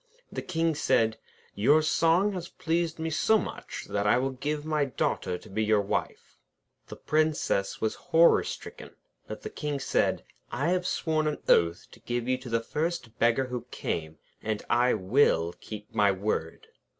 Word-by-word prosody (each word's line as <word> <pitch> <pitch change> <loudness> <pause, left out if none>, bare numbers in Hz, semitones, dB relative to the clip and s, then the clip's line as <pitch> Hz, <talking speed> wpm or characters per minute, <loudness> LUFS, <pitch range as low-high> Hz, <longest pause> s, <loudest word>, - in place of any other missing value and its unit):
The - - -4
King 165 -2 0
said: 115 -6 +1 0.3
'Your 145 +10 +4
song 170 +6 +3
has 180 -2 -5
pleased 170 -2 -1
me 160 0 -3
so 220 +8 +3
much, - - -6
that 100 0 -1
I 105 - +5
will 135 +2 0
give 145 +3 -3
you 155 - -7
my 150 -2 +2
Daughter 90 -8 -1
to - - -15
be 110 +3 -1
your 110 -1 +3
wife.' 100 - -3 0.5
The - - -8
Princess 155 -10 0
was 110 - 0 0.2
horror 165 +1 +6
stricken. - - -8 0.3
But - - -7
the - - -6
King 145 -1 -3
said: 135 - 0 0.3
'I 145 +6 0
have 180 0 +1
sworn 155 -3 0
an 150 - -1
oath 85 0 +3
to - - -15
give 120 0 -3
you 130 0 +1
to 130 -1 -9
the 115 0 +1
first 150 -3 -3
beggar 120 +3 +3
who 125 -2 -5
came; 80 -1 -4 0.2
and 110 -1 -3
I 120 +1 +4
will 95 -5 +2
keep 105 -1 -9
my 105 -2 +4
word.' 95 -4 -3
130 Hz, 175 wpm, -28 LUFS, 110-160 Hz, 0.5 s, horror